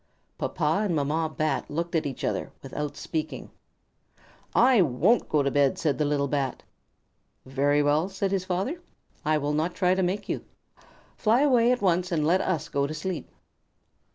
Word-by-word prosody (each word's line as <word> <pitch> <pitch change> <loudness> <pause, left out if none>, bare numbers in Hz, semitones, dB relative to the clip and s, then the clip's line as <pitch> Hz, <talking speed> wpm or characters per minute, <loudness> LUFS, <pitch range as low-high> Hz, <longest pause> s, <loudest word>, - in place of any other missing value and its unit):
Papa 155 +7 0
and 190 -6 0
Mamma 155 +2 0
Bat 155 -3 -1
looked 170 +3 -3
at 160 -3 +1
each 135 - -6
other - - -2
without 145 -1 -5
speaking. 155 +2 -4 1.0
"I 250 -3 +6
won't 170 - +2
go 150 -2 +2
to 140 - 0
bed!" 140 -1 +2
said 145 -6 0
the 150 - +2
little 145 -1 +1
Bat. 135 -2 -2 0.8
"Very 140 +2 +2
well," 150 +5 +2
said 195 0 -2
his 195 -2 0
father. 195 - -2 0.4
"I 155 +1 +2
shall 145 0 -1
not 160 +4 -1
try 180 -1 +3
to 190 - 0
make 190 +3 -1
you. - - -3 0.7
Fly 230 +4 +3
away 250 -4 +4
at 250 -3 0
once 180 -1 +2
and 155 -3 +1
let 180 +4 +3
us 175 -5 -1
go 140 0 0
to 155 - -5
sleep." 175 +2 -4
160 Hz, 175 wpm, -26 LUFS, 145-190 Hz, 1.0 s, I